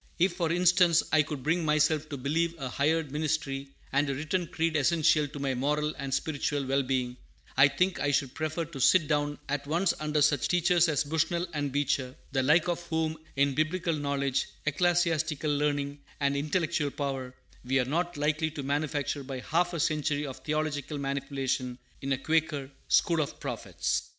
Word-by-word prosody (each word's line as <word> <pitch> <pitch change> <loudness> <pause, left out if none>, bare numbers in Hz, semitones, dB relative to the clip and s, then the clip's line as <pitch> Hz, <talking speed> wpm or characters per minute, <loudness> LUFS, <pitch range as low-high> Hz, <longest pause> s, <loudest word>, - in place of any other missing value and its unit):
If, 175 +1 +3
for 170 -2 -1
instance, 175 -1 +4
I 155 - +5
could 145 -3 -5
bring 165 +3 +1
myself 155 0 +2
to 145 - -4
believe 160 +6 0
a 135 -4 -4
hired 150 +3 0
ministry 145 -2 -2 0.2
and 145 +1 +2
a 135 - -1
written 165 +5 -1
creed 165 -1 -1
essential 155 0 +3
to 145 +1 -10
my 140 -1 -1
moral 150 +4 0
and 140 -1 -5
spiritual 145 -1 -1
well 135 +1 +2
being, 125 -2 -1 0.4
I 135 - +7
think 180 +7 0
I 145 - +1
should 135 -2 0
prefer 155 +1 -2
to 155 -4 -9
sit 155 +4 +5
down 145 -1 0
at 140 0 -2
once 170 +4 +2
under 150 -1 +1
such 145 -3 +3
teachers 175 -1 +3
as 150 -1 +1
Bushnell 160 +4 0
and 145 -2 -2
Beecher, 135 -2 0 0.2
the 135 -1 +1
like 155 +6 +4
of 175 -1 -1
whom 160 -1 0 0.2
in 140 0 +2
Biblical 165 +3 0
knowledge, 140 -2 -1 0.2
ecclesiastical 160 -2 +1
learning, 145 -1 -1 0.2
and 140 -1 +1
intellectual 155 +1 0
power, 135 -3 -4 0.3
we 135 +2 +1
are 125 - +2
not 170 +5 -1
likely 155 +2 +1
to 150 -2 -6
manufacture 145 0 -1
by 130 -1 -5
half 175 +5 +1
a 170 - -2
century 150 -1 0
of 135 -2 -6
theological 150 +1 -2
manipulation 135 -2 -2 0.2
in 135 - -3
a 135 - +2
Quaker 155 -1 0 0.2
"school 165 -2 +3
of 145 - -1
the - - -13
prophets." - - -3
150 Hz, 180 wpm, -29 LUFS, 140-160 Hz, 0.4 s, I